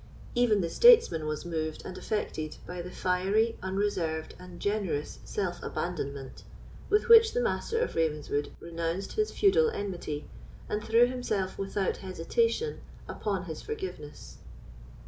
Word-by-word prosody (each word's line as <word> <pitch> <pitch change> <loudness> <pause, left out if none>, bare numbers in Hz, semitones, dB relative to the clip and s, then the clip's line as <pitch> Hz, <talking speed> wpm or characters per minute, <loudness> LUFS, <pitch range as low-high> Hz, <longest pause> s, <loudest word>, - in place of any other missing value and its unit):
Even 240 -5 +3
the 170 - -1
statesman 455 - +6
was 155 +2 -3
moved 160 -2 -3
and 185 - -6
affected 155 -9 -3
by 180 0 -5
the 180 - -7
fiery, 195 +6 +1
unreserved, 185 -5 -1
and 180 -1 -11
generous 195 -8 -2
self 180 -4 -3
abandonment 140 -6 -4 0.5
with 420 +3 +3
which 455 -1 +8
the - - +3
Master 470 -1 -1
of 480 +1 0
Ravenswood 150 -2 -1
renounced 170 +3 -3
his 430 0 +1
feudal 440 +4 +4
enmity, 180 - -4 0.4
and 210 0 -2
threw 230 +2 +5
himself 220 -7 -2
without 195 0 -1
hesitation 450 - -1 0.3
upon 195 -3 -2
his 160 -3 -6
forgiveness. 380 - -7
190 Hz, 130 wpm, -29 LUFS, 165-245 Hz, 0.5 s, which